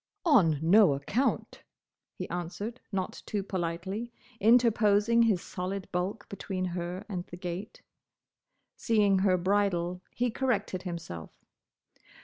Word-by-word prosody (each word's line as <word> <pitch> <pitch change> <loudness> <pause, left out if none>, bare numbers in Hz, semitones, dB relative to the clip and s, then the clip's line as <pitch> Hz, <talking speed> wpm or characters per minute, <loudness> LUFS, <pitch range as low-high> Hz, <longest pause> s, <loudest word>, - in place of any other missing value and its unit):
"On 195 - +5
no 185 -1 +6
account!" 205 - -1 0.6
he - - -4
answered, 195 +7 -5
not 190 -2 -3
too 205 -2 -2
politely, 190 +5 -3 0.3
interposing 225 0 +4
his 215 -6 +3
solid 185 +1 -4
bulk 180 +4 -2
between 190 -2 -4
her 180 +2 -4
and 185 -5 -4
the 175 - -9
gate. 180 +4 -6 0.9
Seeing 210 -5 +3
her 190 -1 +3
bridle, 180 -2 0
he 245 0 -1
corrected 215 -7 -1
himself. 165 - -6
195 Hz, 115 wpm, -29 LUFS, 180-215 Hz, 0.9 s, no